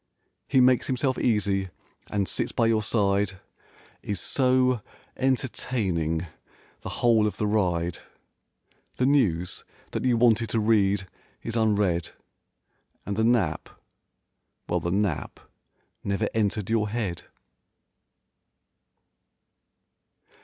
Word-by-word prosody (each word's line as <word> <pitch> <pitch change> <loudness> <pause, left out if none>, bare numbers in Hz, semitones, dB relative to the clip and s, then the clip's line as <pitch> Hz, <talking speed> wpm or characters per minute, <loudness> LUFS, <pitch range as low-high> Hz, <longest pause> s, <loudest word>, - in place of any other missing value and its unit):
He 130 - +3
makes 125 0 +4
himself 130 0 0
easy 100 -4 +1 0.4
and 100 -2 -1
sits - - -1
by 115 - +1
your 115 -1 +2
side, 100 -2 0 0.6
Is 100 -3 -3
so 130 +1 +2 0.3
entertaining 100 -11 -1 0.3
(?) - - -31
the - - -6 0.2
whole 110 -3 +5
of 105 - -4
the 105 - -1
ride. 90 -5 0 1.0
The 125 - +1
news 95 - +1 0.3
that - - -3
you 125 -2 +3
wanted 115 -1 +3
to 115 - 0
read 100 -3 +2 0.4
is 115 - -4
unread 105 -6 +1 0.9
And 100 - -3
the 110 - +1
nap—well 90 - -3
the 85 - -3
nap 95 -3 -1 0.6
never 100 +2 0
entered 105 -2 0
your 110 -2 +1
head. 100 -6 -3
105 Hz, 105 wpm, -26 LUFS, 95-120 Hz, 1.0 s, whole